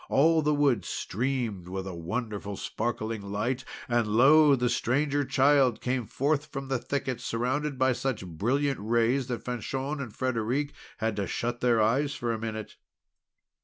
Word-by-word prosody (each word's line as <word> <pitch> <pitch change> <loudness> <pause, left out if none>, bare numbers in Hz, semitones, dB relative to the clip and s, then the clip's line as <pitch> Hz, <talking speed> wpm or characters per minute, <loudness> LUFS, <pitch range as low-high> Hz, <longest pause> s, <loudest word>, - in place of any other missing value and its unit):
All 160 +3 +4
the 150 0 +2
wood 140 -9 +2
streamed 115 -4 -2
with 95 +1 -4
a 95 - -5
wonderful 100 +3 -4
sparkling 110 -1 -3
light. 105 +6 -2 0.2
And, 120 -2 +1
lo! 140 +7 +6
the 125 -1 0
Stranger 140 +4 +1
Child 135 -3 +3
came 125 -3 -2
forth 145 +2 0
from 135 -2 -6
the 135 -2 0
thicket, 130 -2 -3
surrounded 130 +5 -1
by 130 0 +3
such 125 -5 -2
brilliant 125 - 0
rays 120 +4 +1
that 120 -2 -4
Fanchon 135 +4 -3
and 125 -5 -6
Frederic 130 +4 -1 0.2
had 110 -1 -1
to 100 -2 -1
shut 120 0 -3
their 120 -2 +3
eyes 135 +7 +2
for 120 -1 -1
a 110 - -3
minute. 110 -1 -5
125 Hz, 160 wpm, -28 LUFS, 110-135 Hz, 0.2 s, lo